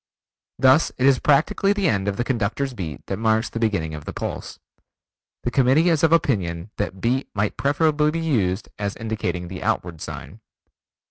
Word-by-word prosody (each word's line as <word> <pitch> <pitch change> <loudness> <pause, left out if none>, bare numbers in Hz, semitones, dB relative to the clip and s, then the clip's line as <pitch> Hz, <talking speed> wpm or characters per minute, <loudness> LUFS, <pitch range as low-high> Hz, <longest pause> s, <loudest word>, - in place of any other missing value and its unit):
Thus 130 +5 +4
it 130 - +1
is 135 -2 +5
practically 175 +7 +3
the 200 -3 0
end 100 -8 0
of 100 -1 -1
the 120 - 0
conductor's 125 +2 -1
beat 85 - -6
that 95 - -3
marks 110 0 +1
the 115 - -4
beginning 100 -9 0
of 75 -1 -7
the - - -6
pulse. - - -5 0.9
The 120 - -1
Committee 135 +7 +4
is 160 -3 +2
of 165 - +4
opinion 100 - +1
that 95 -2 -3
Beat 125 +6 0
might 100 0 0
preferably 150 +1 +2
be 165 +2 -2
used 110 - 0
as 100 -1 -2
indicating 100 -6 -3
the 90 0 -7
outward 85 -3 -2
sign. - - -8
115 Hz, 180 wpm, -23 LUFS, 95-140 Hz, 0.9 s, is